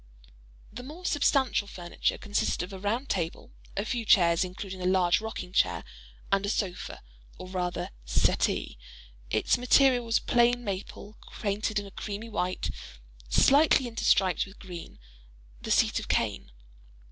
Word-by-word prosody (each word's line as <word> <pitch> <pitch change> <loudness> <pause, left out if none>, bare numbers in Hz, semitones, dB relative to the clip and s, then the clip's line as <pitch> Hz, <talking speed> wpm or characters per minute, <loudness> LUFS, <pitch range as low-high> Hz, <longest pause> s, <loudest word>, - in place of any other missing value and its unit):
The 240 - -7
more 310 +8 -10
substantial 270 - +2
furniture 175 -3 -2
consisted 205 -4 -1
of 180 - -8
a 190 - -7
round 225 +8 -1
table, 170 -7 -3 0.3
a 200 - 0
few 235 +1 -2
chairs 170 -5 +5
(including 185 +1 -7
a 180 - 0
large 185 0 +3
rocking 220 -4 -6
chair), - - +2 0.5
and 195 0 +2
a 200 - -1
sofa, 190 -4 -3 0.3
or - - -8
rather 180 -1 -3
"settee;" - - 0 0.5
its - - +2
material 250 0 +4
was 230 -1 +2
plain 245 0 +2
maple 205 +1 -6 0.2
painted 210 +1 -1
a 200 - -11
creamy 210 +3 -6
white, 180 - -2 0.6
slightly 275 - +5
interstriped 195 -6 +2
with 195 - -15
green; 175 -4 -9 0.6
the - - -7
seat - - +3
of - - -8
cane. - - -1
200 Hz, 140 wpm, -28 LUFS, 185-235 Hz, 0.6 s, chairs